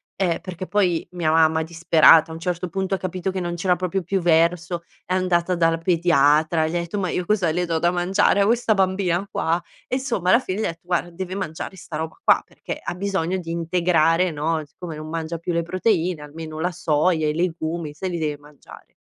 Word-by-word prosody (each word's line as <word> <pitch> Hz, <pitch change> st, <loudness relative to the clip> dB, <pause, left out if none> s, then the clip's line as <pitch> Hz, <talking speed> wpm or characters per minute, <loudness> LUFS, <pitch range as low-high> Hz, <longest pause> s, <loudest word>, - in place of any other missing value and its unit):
ehm, 180 Hz, -4 st, 0 dB
perché, 185 Hz, 0 st, -7 dB
poi, 185 Hz, -5 st, +1 dB
mia 165 Hz, -3 st, 0 dB
mamma 160 Hz, 0 st, +3 dB
disperata 165 Hz, -1 st, +5 dB
a 160 Hz, -, -7 dB
un -, -, -8 dB
certo 180 Hz, +1 st, -3 dB
punto, 190 Hz, +1 st, -2 dB
ha -, -, +2 dB
capito 185 Hz, +1 st, -3 dB
che 190 Hz, -, -3 dB
non 175 Hz, -1 st, -3 dB
c'era 180 Hz, +1 st, +1 dB
proprio 185 Hz, +1 st, -2 dB
più 190 Hz, +2 st, -1 dB
verso, 170 Hz, +1 st, +2 dB, 0.2 s
è 185 Hz, -, -1 dB
andata 180 Hz, -1 st, +1 dB
dal 165 Hz, -1 st, +2 dB
pediatra, 160 Hz, -2 st, +3 dB
gli 160 Hz, -, -4 dB
ha -, -, +1 dB
etto: 170 Hz, +4 st, -4 dB
"Ma 185 Hz, -2 st, -1 dB
io 180 Hz, -, -2 dB
cosa 190 Hz, -4 st, +1 dB
le 175 Hz, +2 st, 0 dB
do 165 Hz, -1 st, -1 dB
da 175 Hz, -, +3 dB
mangiare 180 Hz, +3 st, +2 dB
a -, -, +4 dB
questa 230 Hz, 0 st, +2 dB
bambina 190 Hz, -1 st, +1 dB
qua?" 165 Hz, +2 st, 0 dB, 0.3 s
E, -, -, -1 dB
insomma, 245 Hz, -9 st, -1 dB
alla 230 Hz, -, +6 dB
fine 195 Hz, -5 st, -4 dB
gli -, -, 0 dB
ha -, -, +1 dB
detto: 165 Hz, -, -6 dB
"Guarda, 175 Hz, 0 st, -1 dB
deve 185 Hz, +1 st, -6 dB
mangiare 190 Hz, -1 st, -5 dB
'sta 165 Hz, -3 st, -7 dB
roba 160 Hz, 0 st, -4 dB
qua, -, -, +4 dB
perché -, -, -7 dB
ha -, -, -4 dB
bisogno 190 Hz, -1 st, -1 dB
di 165 Hz, -2 st, -8 dB
integrare, 170 Hz, 0 st, +2 dB
no, 155 Hz, +1 st, -1 dB
siccome 160 Hz, +2 st, -9 dB
non 155 Hz, +1 st, -8 dB
mangia 165 Hz, 0 st, -4 dB
più 170 Hz, -, -3 dB
le 170 Hz, 0 st, 0 dB
proteine, 180 Hz, -2 st, 0 dB
almeno 155 Hz, +1 st, -8 dB
la 175 Hz, -, 0 dB
soia, 160 Hz, -1 st, +1 dB
i 150 Hz, -, 0 dB
legumi, 165 Hz, -1 st, -2 dB
se 190 Hz, +5 st, -4 dB
li 175 Hz, -2 st, -3 dB
deve 150 Hz, -2 st, -2 dB
mangiare." 145 Hz, 0 st, -16 dB
170 Hz, 220 wpm, -22 LUFS, 160-185 Hz, 0.3 s, alla